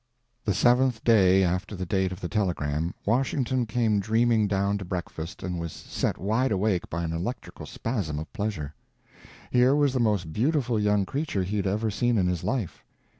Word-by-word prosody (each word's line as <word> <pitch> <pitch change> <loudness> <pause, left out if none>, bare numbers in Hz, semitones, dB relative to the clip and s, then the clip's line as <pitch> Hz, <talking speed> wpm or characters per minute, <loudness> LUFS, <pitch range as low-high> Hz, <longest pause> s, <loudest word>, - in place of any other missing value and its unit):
The 100 -4 +1
seventh 125 +2 +3
day 95 -4 +5
after 95 +3 -1
the 95 -1 -4
date 95 +1 0
of 90 +2 -7
the 90 - -2
telegram 85 -5 -1
Washington 125 +1 +1
came 110 -2 +1
dreaming 110 +1 +2
down 100 +1 0
to - - -5
breakfast 90 0 -5
and 90 -2 -3
was 85 -1 -4
set - - -3
wide 110 +8 0
awake 95 -2 0
by 85 +1 -3
an 80 -1 -2
electrical 90 +10 -5
spasm 100 - -3
of 75 0 -7
pleasure. 100 -9 -3 0.8
Here 125 +2 +4
was 145 -3 +3
the 130 - 0
most 100 -9 0
beautiful 125 -2 +1
young 105 -1 +2
creature 140 -6 -2
he 100 +3 -2
had 100 -1 0
ever 105 +3 0
seen 120 +3 +1
in 95 - +2
his 90 -2 -1
life. 120 -10 -2
105 Hz, 180 wpm, -26 LUFS, 90-120 Hz, 0.8 s, day